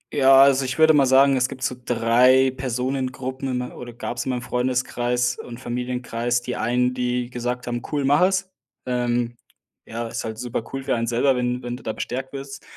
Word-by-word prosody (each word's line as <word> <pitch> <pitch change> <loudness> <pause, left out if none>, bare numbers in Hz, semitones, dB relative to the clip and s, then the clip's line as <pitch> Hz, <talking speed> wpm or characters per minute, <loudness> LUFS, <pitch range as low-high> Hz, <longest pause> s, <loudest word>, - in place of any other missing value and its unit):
Ja, 135 -1 +6
also 135 -1 +4
ich 130 0 -3
würde 160 0 +6
mal 140 -3 +4
sagen, 135 +1 +5
es 130 0 +1
gibt 130 - -8
so 125 - -1
3 125 +3 +4
Personengruppen 130 +1 -3
in 125 - -1
me 125 0 -5
oder 120 -1 -9
gab's 120 0 -5
in - - -3
meinem 125 -2 -2
Freundeskreis 125 -1 -1
und 120 0 -8
Familienkreis. 120 -1 -2
Die 125 - -4
einen, 125 +2 +1
die 125 0 -2
gesagt 125 0 -3
haben: 120 -1 -3
„Cool, 145 -2 0
mach 145 +4 +4
es.“ 190 +1 +2 0.4
Ähm, 120 -1 -1 0.5
ja, 115 +1 -5
ist - - -5
halt 110 -1 -5
super 120 -1 -3
cool 135 - -4
für - - +1
einen 115 0 -2
selber, 125 +3 +2
wenn 125 0 -1
wenn 120 0 -4
du 125 - -12
da 110 - -2
bestärkt 130 +4 -5
wirst. 135 0 -8
125 Hz, 200 wpm, -23 LUFS, 120-130 Hz, 0.5 s, Ja